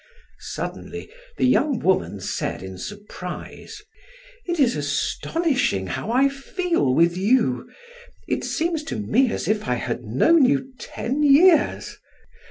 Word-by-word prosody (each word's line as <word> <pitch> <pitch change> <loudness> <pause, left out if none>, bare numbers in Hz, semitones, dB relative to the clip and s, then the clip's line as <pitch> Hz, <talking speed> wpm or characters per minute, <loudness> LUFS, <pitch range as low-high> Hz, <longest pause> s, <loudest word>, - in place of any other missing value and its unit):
Suddenly - - -6 0.3
the - - +2
young 265 +1 +3
woman 185 - 0
said - - -3
in 95 -1 -8
surprise: 205 - -8 0.6
"It 345 -2 -2
is 255 -4 +3
astonishing 150 - -1
how 95 - -4
I 260 +4 +4
feel 275 - -1
with 170 +2 +3
you. 190 - +1 0.6
It - - -1
seems 330 -1 -1
to 320 - -4
me 230 +4 +1
as - - -3
if 210 -6 0
I 125 - +1
had 120 0 -3
known 135 - +3
you 265 0 +1
ten 270 +5 -3
years. 300 +3 +4
245 Hz, 130 wpm, -23 LUFS, -, 0.6 s, I